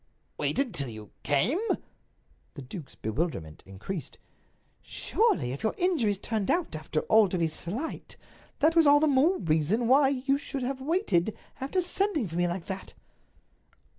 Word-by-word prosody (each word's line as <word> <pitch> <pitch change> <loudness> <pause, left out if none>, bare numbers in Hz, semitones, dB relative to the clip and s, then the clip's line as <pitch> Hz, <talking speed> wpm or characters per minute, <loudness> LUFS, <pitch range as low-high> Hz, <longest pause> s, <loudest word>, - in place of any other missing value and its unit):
"Wait - - -1
until 175 - 0
you 110 -2 -10
came?" 145 - +1 1.0
The 140 - -7
duke's 140 +3 -9
bewilderment 110 - -3
increased. 130 - -6 0.6
"Surely, 435 - 0
if 135 - -6
your 220 - 0
injuries 280 - +1
turned 215 0 -2
out, 340 - 0
after 155 0 -2
all, 215 -3 +4
to 185 - -1
be 165 -1 +2
slight, 200 - -5 0.4
that 320 +3 +4
was 330 -3 +6
all 290 0 +7
the 310 - +3
more 300 +6 +3
reason 165 +9 +1
why 270 +2 +5
you 275 +1 0
should 275 -2 -5
have 265 +1 -3
waited, 260 - +1 0.2
after 280 +8 0
sending 360 - 0
for 165 - -8
me 175 0 +2
like 175 0 -4
that." 190 0 -7
220 Hz, 155 wpm, -28 LUFS, -, 1.0 s, all